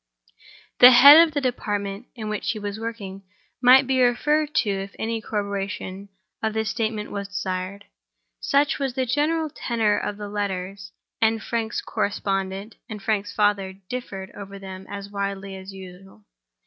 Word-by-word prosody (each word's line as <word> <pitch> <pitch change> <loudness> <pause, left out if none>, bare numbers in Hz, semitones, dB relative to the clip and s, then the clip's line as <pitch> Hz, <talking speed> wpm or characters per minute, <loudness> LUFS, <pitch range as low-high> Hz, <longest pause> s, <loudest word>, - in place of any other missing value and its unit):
The 250 - +11
head 285 +5 +10
of 310 - -12
the 285 - +1
department 205 -4 -3
in 220 -3 -6
which 210 -1 -3
he - - -7
was 205 0 -5
working 215 -4 -6 0.4
might 260 +2 +7
be 260 0 +1
referred 295 +5 +2
to 215 - +2
if 195 0 -4
any 225 0 -2
corroboration 200 -2 -4 0.3
of 220 -1 -1
this 220 -2 0
statement 220 -2 -2
was 200 -1 -4
desired. 195 0 -4 0.5
Such 285 +2 +2
was 270 -3 -2
the 260 -1 0
general 305 +5 0
tenor 225 -6 0
of 205 - -4
the 210 -1 -6
letters; 195 -1 -4 0.3
and 225 0 +3
Frank's 225 0 -2
correspondent 195 +1 -2
and 215 -1 -6
Frank's 205 -1 -1
father 205 -2 +1 0.2
differed 200 -7 -6
over 200 0 -9
them 190 -1 -9
as 200 0 -7
widely 200 -1 -4
as 190 +1 -9
usual. 190 - -13
205 Hz, 155 wpm, -24 LUFS, 195-235 Hz, 0.5 s, The